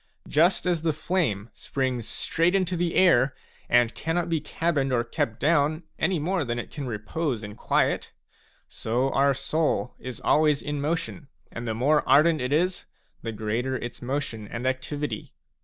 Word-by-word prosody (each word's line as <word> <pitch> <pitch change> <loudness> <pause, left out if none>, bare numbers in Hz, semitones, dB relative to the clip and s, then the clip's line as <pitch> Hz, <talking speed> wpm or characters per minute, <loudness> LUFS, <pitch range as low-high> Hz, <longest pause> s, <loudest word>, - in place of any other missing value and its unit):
Just 170 +6 +3
as 175 -3 +1
the 160 -1 +1
flame 145 - -1
springs 130 -4 -2
straight 170 +9 +1
into 185 -2 +1
the 170 -1 -1
air 135 -8 +5 0.3
and 120 -1 +4
cannot 170 +2 -1
be 165 -2 0
cabined 150 -2 0
or 120 -2 +2
kept 115 -1 -2
down 155 +2 +2 0.2
any 190 -2 +2
more 175 +3 0
than 120 -2 -2
it 120 - -5
can 145 -4 -5
repose 120 +3 -2
in 105 0 -7
quiet, - - 0 0.6
so 125 +4 -1
our 140 0 +3
soul 140 -1 0
is 130 -2 -7
always 150 -1 +3
in 145 -1 -3
motion, 160 0 -2 0.2
and 115 0 -6
the 110 - -1
more 145 +6 +3
ardent 155 0 +5
it 125 +1 -2
is, 175 +5 +1 0.4
the 115 - -4
greater 110 +5 -2
its 120 -1 -6
motion 125 -5 -3
and 115 +4 -5
activity. 130 -1 -3
140 Hz, 165 wpm, -26 LUFS, 120-165 Hz, 0.6 s, air